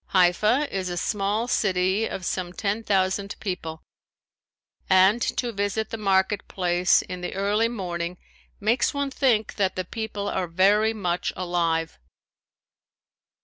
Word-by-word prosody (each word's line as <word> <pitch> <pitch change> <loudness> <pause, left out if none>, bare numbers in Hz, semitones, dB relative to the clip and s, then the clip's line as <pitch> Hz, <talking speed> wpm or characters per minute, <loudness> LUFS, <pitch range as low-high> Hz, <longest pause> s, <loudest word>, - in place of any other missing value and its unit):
Haifa 210 +10 +3
is 185 -1 -2
a 175 - -4
small 205 +5 -1
city 190 -1 +1
of 185 - -6
some 180 0 -3
ten 205 +3 -2
thousand 195 0 0
people 165 -5 -5 1.1
and 190 +5 +5 0.2
to 240 -2 -1
visit 205 +1 -2
the 225 - -3
market 195 -1 +1
place 180 -1 +2
in 180 0 -7
the 180 - -5
early 205 +4 +1
morning 175 -5 -4 0.4
makes 230 +6 +1
one 280 -1 -1
think 240 -6 +1
that 190 -2 +1
the 185 - -3
people 210 0 -4
are 185 -3 -1
very 200 +6 +3
much 180 -5 -2
alive. 170 - -1
195 Hz, 135 wpm, -25 LUFS, 180-215 Hz, 1.1 s, and